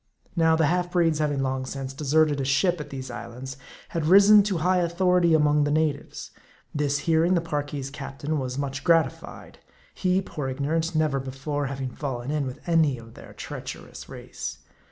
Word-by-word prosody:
Now, 160 -1 +4
the 160 -1 +3
half 175 +3 +1
breeds 165 -3 +2
having 145 -3 0
long 130 0 -1
since 135 0 -5
deserted 150 0 +2
a - - -1
ship 155 +6 +2
at 150 - -8
these 130 -2 -6
islands, 125 +2 -7 0.3
had 165 -2 -2
risen 200 +3 +8
to 195 -4 0
high 180 +3 +2
authority 175 -1 +3
among 150 -1 +3
the 145 - 0
na 155 0 +2
tives. 140 - -10 0.4
This 145 -1 0
hearing, 165 +2 +3
the - - +3
Parki's 145 -4 -4
captain 145 +2 -4
was 130 -1 -4
much 140 0 -3
gratified; 165 -6 0 0.3
he, 185 0 +1
poor 150 -7 -5
ignorant, 160 +5 -1
never 155 -3 +1
before 135 +2 -3
having 135 -1 -4
fallen 130 -2 -4
in 150 -3 -1
with 130 - -9
any 160 -6 +3
of 115 -1 -13
their - - -13
treacherous - - -8
race. - - -7
150 Hz, 175 wpm, -25 LUFS, 135-165 Hz, 0.4 s, risen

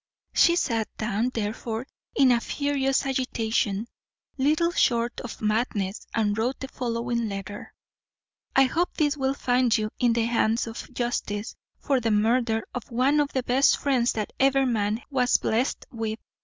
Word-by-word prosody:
She 340 - +5
sat 230 -10 0
down 220 +2 0
therefore 225 +2 -3 0.3
in 270 -2 +5
a 240 - +4
furious 275 -1 0
agitation, 225 -5 -1 0.5
little 305 +5 +2
short 235 -6 +1
of 245 - -8
madness, 210 -2 -1
and 210 -2 +1
wrote 240 +5 -1
the 265 - -6
following 235 -2 -2
letter: 200 +1 -7 0.8
"I 270 - +7
Hope 330 +7 0
this 295 -2 +2
will 270 -1 0
find 245 -3 +2
you 215 0 -2
in 240 -2 +3
the 230 -1 +1
hands 230 -1 +1
of 225 +3 -8
justice, 240 -3 -3 0.2
for 275 -2 +1
the 230 -2 -1
murder 225 +1 +2
of 250 -3 -6
one 260 +5 +2
of 290 -1 +1
the 260 - 0
best 260 +3 +4
friends 255 -4 +1
that 215 -2 -4
ever 270 0 +4
man 220 -1 0
was 255 -2 +3
blest 235 +5 -1
with. 225 -2 -3
240 Hz, 155 wpm, -26 LUFS, 220-265 Hz, 0.8 s, I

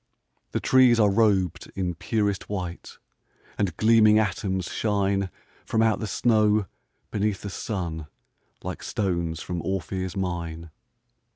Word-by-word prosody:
The - - 0
trees 130 -3 +5
are 105 -2 +5
rob'd 95 -5 +1
in 90 -2 -1
purest 100 +2 -1
white, 90 -4 -5 0.6
And 95 -6 -1
gleaming 110 -1 +6
atoms 95 -3 0
shine 100 -1 0 0.3
From 110 0 +1
out 110 -2 +2
the 110 - -3
snow, 105 -1 +3 0.5
beneath 105 -1 -1
the 100 - -5
sun, 85 -8 -4 0.6
Like - - -5
stones 85 -5 -2
from 90 -2 -4
Ophir's 95 +1 -3
mine. 85 -3 -4
100 Hz, 120 wpm, -25 LUFS, 90-105 Hz, 0.6 s, gleaming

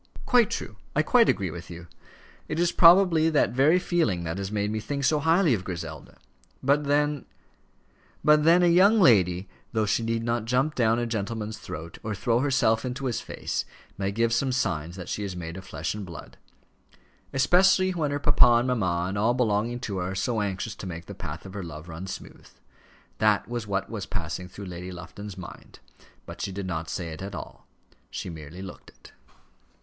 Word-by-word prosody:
"Quite 240 -4 +4
true! 105 - -5 0.2
I 155 - +3
quite 235 +6 +4
agree 95 -4 0
with 85 +1 -9
you. 85 0 -9 0.6
It 155 - -3
is 175 0 +3
probably 170 -2 +6
that 155 - +2
very 140 +7 +4
feeling 165 - 0
that 85 +3 -3
has 100 0 -4
made 105 0 -1
me 110 - -2
think 140 +5 -4
so 150 +2 +3
highly 165 0 +3
of 100 -5 -1
Griselda. 80 -4 -7 0.5
But 145 +2 +2
then 145 0 +1 0.5
" - - -35
But 150 0 +6
then 170 +3 +5
a - - +5
young 195 +6 +5
lady, 95 - +4 0.3
though 110 -1 +1
she 105 - +1
need 115 0 -1
not 115 -1 -1
jump 130 +6 +1
down 115 -3 +2
a 120 - 0
gentleman's 110 -1 -3
throat, 80 +2 -8
or 110 -1 -3
throw 115 +4 +1
herself 125 -5 +2
into 130 +1 -4
his 120 -1 -1
face, - - -3 0.3
may 100 0 -2
give 115 +2 +1
some 130 +3 +1
signs 85 -9 -1
that 90 -2 -8
she 105 - -3
is 95 -3 -4
made 85 -1 -6
of 95 0 -9
flesh 80 -2 -3
and 105 -1 -6
blood; 85 -4 -10 1.0
especially 185 +7 +4
when 160 -5 -1
her 145 - -1
papa 130 -4 +5
and 125 - -2
mamma 90 -8 0
and 100 +2 -3
all 115 +4 +2
belonging 120 0 0
to 100 -5 -4
her 90 +1 -2
are - - -7
so 110 +3 0
anxious 100 +2 -3
to 95 - -7
make 85 -1 -6
the 100 - -8
path 85 -3 -7
of 95 - -9
her 100 - -5
love 80 -2 -8
run 85 +3 -7
smooth. 95 - -9 0.7
That 105 -1 +3
was 120 -2 -4
what 95 -1 -1
was 110 -4 -6
passing 90 -1 -4
through 100 +3 -9
Lady 90 0 -7
Lufton's 100 +3 -9
mind; 90 - -11 0.5
but - - -9
she 100 - -3
did 100 0 -5
not 80 -3 -3
say 85 -3 -4
it 95 +5 -7
all; - - -9 0.4
she 90 - -5
merely 80 +3 -9
looked 95 - -10
it. - - -18
110 Hz, 200 wpm, -26 LUFS, 90-135 Hz, 1.0 s, probably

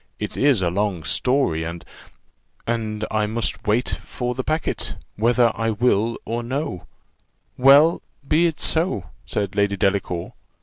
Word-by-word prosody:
It - - -5
is 135 -8 +3
a 85 - +1
long 100 -3 -1
story, 125 - +1
and 85 +1 -6 0.4
" - - -43 0.3
"And 110 -2 -2
I 105 -1 +1
must 110 0 -3
wait 110 +4 +2
for 125 -1 -4
the 130 +1 -3
packet, 155 +3 -2 0.2
whether 115 +2 +3
I 115 0 -1
will 115 0 +1
or 115 +2 -2
no 130 - -4 0.7
well, 140 +5 +6 0.3
be 165 +4 +4
it 155 -3 -4
so," 160 - 0 0.2
said 100 -1 -2
Lady 100 -1 +1
Delacour. 95 -3 -1
115 Hz, 145 wpm, -22 LUFS, 100-130 Hz, 0.7 s, well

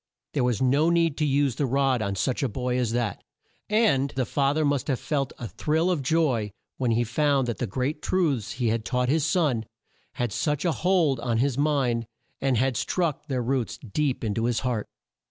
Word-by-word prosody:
There - - +1
was 125 -2 +1
no 140 +6 +3
need 165 -3 +2
to 150 - +1
use 140 -3 +1
the 140 - +1
rod 135 -1 +2
on 100 -2 -1
such 125 +6 -1
a 135 - 0
boy 125 +2 -1
as 120 -3 0
that, 120 -5 -2 0.5
and 210 - +3
the 130 -1 0
fa 140 +2 +1
ther 155 -1 +2
must 145 -3 0
have 135 -4 0
felt 140 -3 -1
a 120 - -5
thrill 160 - 0
of 170 -5 0
joy 135 -7 +1 0.3
when 125 -2 0
he 115 +1 +2
found 135 +2 +1
that 120 - -3
the 125 - -1
great 130 +8 -2
truths 150 - 0
he 120 -2 0
had 115 0 0
taught 125 +1 0
his 155 +2 +2
son 150 - +1 0.5
had 120 -3 -2
such 150 - -1
a 170 - +3
hold 160 -3 +2
on 115 -1 -1
his 130 +2 +1
mind 135 -6 +1 0.3
and 135 -3 +2
had 130 0 +1
struck 165 -5 -1
their 130 -4 -1
roots 125 -1 -1
deep 130 +3 -2
in 105 -2 0
to 115 +2 -1
his 120 -1 0
heart. 120 -5 -2
135 Hz, 210 wpm, -26 LUFS, 120-150 Hz, 0.5 s, no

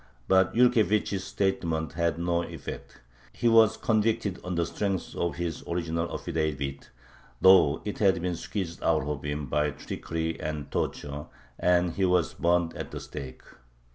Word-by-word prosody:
But 95 +2 +3
Yurkevich's 110 -5 +3
statement 80 -5 -1
had 85 +1 0
no 85 0 0
effect. - - -8 0.3
He 120 - 0
was 115 -1 +6
convicted 110 -4 +1
on 90 0 -3
the 85 0 +1
strength 95 +1 -3
of 85 -4 -1
his 85 -1 -4
original 85 -1 -2
affidavit, 75 -5 -3 0.5
though 90 -5 +6
it 105 - -4
had 95 -4 +4
been 90 0 -2
squeezed 85 -1 -5
out 80 -4 +2
of 75 -1 -4
him 75 0 -3
by 75 +3 +1
trickery 80 +2 -4
and 75 -2 -4
torture, 75 +1 -3 0.3
and 90 -1 +3
he 95 +3 0
was 90 -2 +2
burned 85 -1 +1
at - - -5
the - - -6
stake. 65 -1 -8
85 Hz, 150 wpm, -28 LUFS, 80-95 Hz, 0.5 s, was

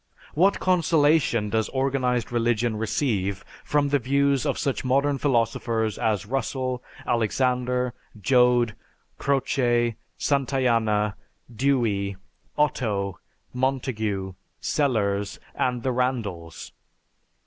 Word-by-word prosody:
What 190 +6 +3
consolation 155 - +2
does 110 -1 0
organized 130 -3 0
religion 120 -1 +1
receive 105 -3 -1 0.2
from 145 -1 +1
the 145 0 +2
views 140 +1 +1
of - - 0
such 140 - -1
modern 140 +2 +1
philosophers 115 -4 0
as 105 -2 0
Russell, 130 +1 -2 0.2
Alexander, 125 +2 0 0.3
Joad, 125 +1 +3 0.5
Croce, 120 -4 +1 0.2
Santayana, 115 -7 +1 0.4
Dewey, 110 -7 +1 0.4
Otto, 105 -10 0 0.3
Montague, 110 -7 -1 0.3
Sellars, 105 -8 0 0.2
and 125 -2 -1
the 130 - +1
Randalls? 110 -10 -3
125 Hz, 90 wpm, -25 LUFS, 110-135 Hz, 0.5 s, What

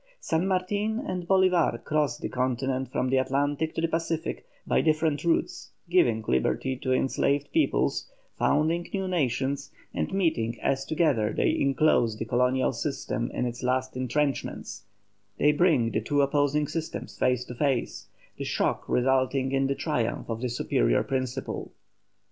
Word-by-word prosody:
San 165 - 0
Martin 205 +4 0
and 185 -10 -4
Bolívar 185 -3 +3
cross 150 -5 0
the - - -4
continent 130 +1 -1
from 130 - 0
the 135 - +3
Atlantic 145 +4 0
to - - -1
the 165 - +2
Pacific 165 -1 -3 0.2
by - - +2
different 155 -2 +1
routes, 105 -11 -1 0.2
giving 120 -12 +3
liberty 65 - +1
to 130 0 -3
enslaved 140 +2 +1
peoples, 320 -2 +1 0.3
founding 160 +4 +1
new 190 -1 -1
nations, 140 -4 -1 0.2
and - - -2
meeting 160 -12 0
as 135 0 0
together 145 -10 +1
they - - +2
enclose 135 -5 +2
the 110 - -3
colonial 125 +3 +1
system 130 -3 -3
in - - -2
its 120 0 -4
last 130 +1 -1
entrenchments, 130 -5 -2 0.5
they 150 - +4
bring 150 -7 +3
the 110 - 0
two 145 +6 +2
opposing 145 +1 +1
systems 160 +1 -5
face 125 -1 +1
to 125 - -7
face, 130 -1 -1 0.3
the - - -4
shock - - -1
resulting 130 +1 +2
in 135 0 +2
the 140 - 0
triumph 125 -8 -2
of 115 0 -4
the 125 - -1
superior - - +1
principle. 130 -2 -3
135 Hz, 150 wpm, -27 LUFS, 125-160 Hz, 0.5 s, they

